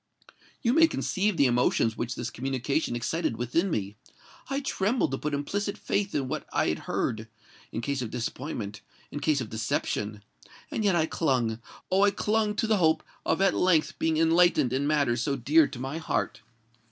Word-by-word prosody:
You 235 - +3
may 325 +2 +6
conceive 200 - -1
the 140 - +5
emotions 120 -2 +2
which 120 +2 -3
this 120 -1 -4
communication 135 +2 -1
excited 120 +2 -1
within 125 - 0
me: 105 - -3 0.5
I 275 0 0
trembled 230 - 0
to 135 - -2
put 150 -1 -2
implicit 200 +8 -2
faith 200 0 -1
in 135 -2 0
what - - -4
I - - +1
heard—in 110 0 -5
case 140 +2 -2
of 120 - -3
disappointment—in 115 0 -6
case 145 -1 +1
of 115 - -6
deception; 105 -1 -2 0.5
and 220 - -1
yet 200 -3 +3
I 160 -2 +3
clung—oh! 125 - -1
I 205 - +6
clung 210 +1 0
to 225 - 0
the 220 -1 +2
hope 160 -3 +3 0.2
of 165 - +1
at 195 - +4
length 170 -4 +2
being 160 -1 +1
enlightened 165 -5 +4
in 140 +2 0
matters 140 -6 +2
so 140 +1 0
dear 145 +4 +4
to 135 - -9
my 135 +5 -4
heart. 115 -8 -2
145 Hz, 170 wpm, -27 LUFS, 120-180 Hz, 0.5 s, may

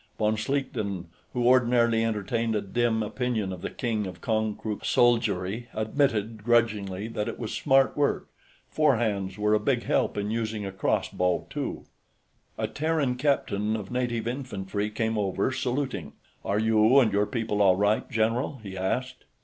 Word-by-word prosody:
Von 110 0 +2
Schlichten, 110 -7 -2 0.2
who 125 -2 -1
ordinarily 120 -2 +4
entertained 115 +1 -1
a 105 - +1
dim 110 +2 0
opinion 110 -3 -2
of 90 - -8
the - - -3
King 110 -5 -2
of 90 -1 -8
Konkrook's 110 0 -2
soldiery, 115 -2 +2
admitted, 110 -2 0
grudgingly, 105 -4 +1
that 105 -1 -3
it 115 - -4
was 115 -3 -5
smart 135 -2 +3
work; 145 -1 0 0.4
four 155 -4 +3
hands 100 -4 -1
were 105 0 +2
a 105 - +4
big 125 +2 0
help - - 0
in 100 +1 -1
using 110 -2 -2
a 95 - -4
crossbow, 90 -1 0
too. - - -4 0.7
A - - -1
Terran 155 -3 0
captain 115 -6 0
of 105 -1 -6
native 120 -2 -1
infantry 105 -5 -3
came 110 0 -1
over, 100 +3 0
saluting. 130 +1 -2 0.3
"Are 100 - 0
you 110 +4 +5
and 110 -6 +3
your 100 +1 +2
people 110 -4 -1
all 95 -2 +6
right, 105 +3 +1
general?" 115 +5 0
he 95 -2 -7
asked. 125 +7 -2
110 Hz, 155 wpm, -27 LUFS, 105-125 Hz, 0.7 s, all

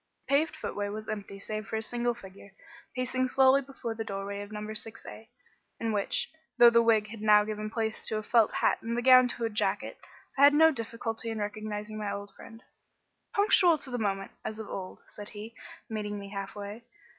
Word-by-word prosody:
The - - -1
paved 310 +3 +2
footway 205 0 -4
was 215 +1 -6
empty 205 -2 -5
save 215 +1 -5
for - - -4
a 220 - -1
single 240 +1 -1
figure, 195 -2 -14 0.4
pacing 255 0 0
slowly 265 +1 +5
before 265 -4 -6
the 225 0 -4
doorway 200 -1 -5
of 205 +1 -9
number 210 0 -5
6A, 220 0 -6 0.5
in 225 -1 -1
which, 205 -2 0 0.3
though 240 -1 +9
the 235 0 +5
wig 220 -2 +3
had 220 0 -9
now 210 -1 +6
given 215 0 -4
place 220 -1 -2
to 215 - 0
a 215 - -4
felt 225 0 +4
hat - - +1
and 230 +1 -3
the 240 - -1
gown 255 0 +8
to 235 -1 -3
a - - 0
jacket, 210 - -1 0.4
I - - +6
had 290 +1 +6
no 320 +1 +7
difficulty 230 -3 -4
in 225 - -3
recognising 210 0 -4
my 200 -1 -3
friend. 225 +1 -13 0.7
"Punctual 380 -5 +5
to 270 -3 -7
the 245 - -2
moment, 195 -2 -2
as 215 - -5
of 220 -1 -7
old," 185 -2 -7
said 205 0 -10
he, 215 +2 -9 0.3
meeting 210 -2 -4
me 200 0 -8
half 195 -1 -5
way. 205 +3 -7
220 Hz, 200 wpm, -29 LUFS, 210-240 Hz, 0.7 s, though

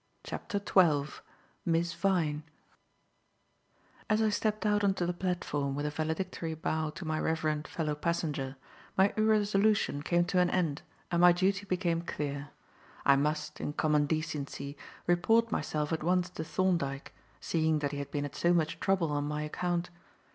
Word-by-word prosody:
CHAPTER 205 - -4
XII 165 -7 +2 0.4
MISS 170 0 +1
VYNE 160 -6 +1 1.7
As 215 0 +3
I 220 -1 +3
stepped 215 +1 -1
out 210 -1 +2
on 195 -1 +3
to 175 - -1
the 175 - 0
platform 175 -6 -2
with 145 +1 -2
a 150 - -1
valedictory 160 +1 -3
bow 160 0 -1
to 180 - -7
my 155 0 -1
reverend 155 -2 0
fellow 155 -3 -2
passenger, 150 -4 -2 0.4
my 195 +1 +4
irresolution 210 -6 +2
came 175 +3 +2
to 180 +1 +1
an 180 0 +4
end 165 -6 0 0.3
and 170 0 +2
my 180 0 +9
duty 195 +3 +1
became 175 -2 0
clear. 145 -3 -4 0.6
I 140 - +7
must, 150 +1 -1
in 145 - -3
common 150 -1 +2
decency, 150 -2 -3 0.3
report 225 +6 +3
myself 150 -4 -1
at 160 - -1
once 180 +2 +1
to 160 - -5
Thorndyke, 160 -6 -1 0.3
seeing 160 -1 +1
that 145 -2 -1
he 145 - -4
had 140 - -5
been 145 -1 -2
at 145 - -7
so 175 +1 +3
much 160 0 0
trouble 185 -5 +1
on 145 0 0
my 150 +1 -2
account. 175 +3 -2
165 Hz, 160 wpm, -31 LUFS, 150-185 Hz, 1.7 s, my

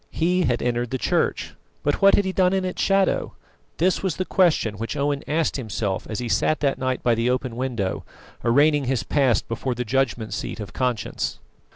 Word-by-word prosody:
He 180 +3 +1
had 120 -2 0
entered 120 0 -1
the 130 - -2
Church, - - 0 0.3
but 145 - 0
what 195 0 +7
had 205 - +1
he 190 - 0
done 185 0 +2
in 190 -1 0
its 185 - -3
shadow? 195 -1 +1 0.4
This 180 +3 +2
was 190 -5 -1
the 185 - -2
question 155 - +2
which 115 - -4
Owen 145 0 0
asked 155 0 0
himself 105 -5 -3
as 110 - -3
he 125 - -3
sat 115 +8 +1
that 140 -2 +1
night 130 -1 -2
by 120 - +3
the 115 +2 +1
open 125 -1 -1
window, 120 -7 -2 0.4
arraigning 145 +4 +3
his 125 -2 0
past 130 -7 +1
before 120 +2 -3
the 125 +1 -3
judgment 115 -4 -1
seat - - -4
of 105 - -7
conscience. 125 -5 -2
130 Hz, 200 wpm, -23 LUFS, 115-155 Hz, 0.4 s, what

